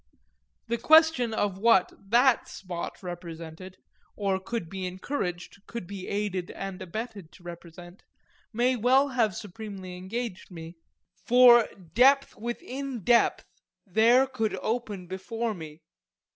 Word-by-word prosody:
The 235 0 -1
question 315 -3 +5
of 205 -3 -1
what 205 -4 +4 0.2
that 245 +2 +4
spot 180 0 -7
represented, 175 0 -8 0.4
or 195 -2 0
could 190 -1 -4
be 190 +1 -5
encouraged, 185 -1 -5
could 235 -6 -6
be 190 0 -8
aided 200 -3 -2
and 195 0 -7
abetted, 200 -1 -6
to 180 - -18
represent, 175 +1 -11 0.5
may 245 +3 +2
well 260 +4 +3
have 230 -7 +1
supremely 200 -3 -8
engaged 190 +2 -5
me 165 -2 -9 0.5
for 245 -1 +7 0.3
depth 275 +3 +4
within 245 +1 -5
depth 240 +3 +3 0.4
there 230 +6 +4
could 225 -5 -2
only - - -9
open 220 -5 -3
before 220 +5 -4
me. 160 -3 -10
205 Hz, 125 wpm, -27 LUFS, 185-240 Hz, 0.5 s, for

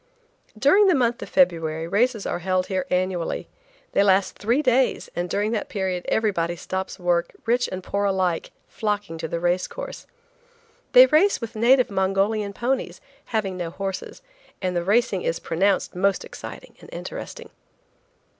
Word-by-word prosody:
During 380 - +5
the 370 - +5
month 240 -2 +1
of - - -7
February 165 - +1
races 220 +3 +1
are - - -2
held 185 +1 0
here 185 -1 -2
annually. 180 -2 -1 0.4
They - - +3
last 195 -1 +3
three 240 +8 +1
days, 255 -1 +1
and 175 0 -2
during 205 +3 0
that 220 -3 -2
period 185 -3 -2
everybody 175 -6 0
stops 190 +2 -4
work, 175 -1 0
rich 245 +2 +1
and 185 0 -5
poor 200 +2 -1
alike 185 -4 0 0.2
flocking 205 -6 -3
to 160 - -3
the 170 - -3
race 175 +1 +1
course. - - -8 0.9
They - - +10
race 390 +2 +3
with 230 -1 -7
native 250 +3 +4
bred 200 - -9
Mongolian 200 +2 +1
ponies, 235 -6 -2 0.3
having 200 -5 -2
no 175 -2 -3
horses, 195 - -6 0.4
and 185 -2 -2
the 175 - +1
racing 200 0 +2
is 165 - -1
pronounced 190 +4 0
most 195 +1 +1
exciting - - -10
and - - -13
interesting. - - -7
195 Hz, 160 wpm, -24 LUFS, 180-230 Hz, 0.9 s, They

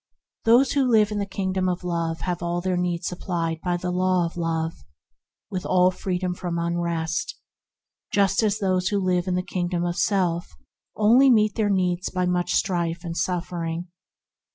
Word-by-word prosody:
Those 245 +4 +5
who 270 -3 +2
live 215 -2 +4
in 210 - -2
the 200 - -2
Kingdom 190 -1 -1
of 180 0 -3
Love 165 -2 -2
have 175 -2 -2
all 175 0 -1
their 185 +1 -1
needs 175 -1 -1
supplied 170 -3 -3
by 175 -1 0
the 180 +1 -3
Law 185 -1 +2
of 170 - -6
Love, 165 -1 -1 0.8
with 185 -2 -3
all 185 0 +3
freedom 180 -1 -2
from 175 -1 -4
unrest, 170 -1 -2 0.8
just 195 0 +3
as 215 -2 +1
those 185 -3 0
who 205 - +1
live 185 -1 0
in 180 - 0
the 180 - 0
kingdom 175 -1 -2
of 175 0 -1
self 175 - 0 0.4
only 240 +6 +5
meet 215 -4 +4
their 210 -1 0
needs 180 -2 0
by 180 0 -1
much 180 0 0
strife 170 -2 0
and 165 -1 -5
suffering. 170 -1 -3
180 Hz, 175 wpm, -24 LUFS, 170-190 Hz, 0.8 s, Those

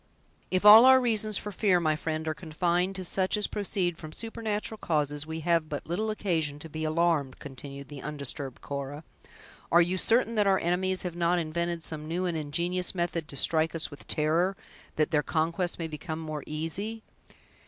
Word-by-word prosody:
"If 185 +2 0
all 220 +3 +11
our 260 0 +8
reasons 215 -4 +2
for 210 - -5
fear, 190 -2 +2
my 155 -2 +1
friend, 155 +1 -3
are 155 - 0
confined 175 +3 -1
to 185 -1 -3
such 190 +3 +1
as 210 - +1
proceed 185 -4 -2
from 155 -1 -9
supernatural 220 -1 -3
causes, 150 -1 -1
we 160 0 -5
have 165 -1 +1
but 145 - -5
little 205 +7 -2
occasion 165 -9 -1
to 160 +2 -9
be 155 +1 -5
alarmed," 155 -4 +1
continued 140 0 -9
the 140 0 -9
undisturbed 140 -3 -4
Cora, 140 +2 -5 0.7
"are 170 - +7
you 175 +2 +2
certain 230 +2 +3
that 210 -3 +2
our 195 -1 +4
enemies 185 +2 0
have 180 -2 -4
not 175 +1 +2
invented 170 +1 -2
some 155 -1 -5
new 175 +3 -1
and 175 -2 -1
ingenious 170 +5 -1
method 170 -3 -2
to 140 - -7
strike 160 +3 +2
us 160 - -1
with 145 - -12
terror, 165 +5 +1 0.4
that 155 -1 +1
their 150 - +3
conquest 170 +3 -1
may 165 - -3
become 160 +1 -6
more 155 -3 -5
easy?" 195 +9 -4
170 Hz, 185 wpm, -28 LUFS, 155-185 Hz, 0.7 s, all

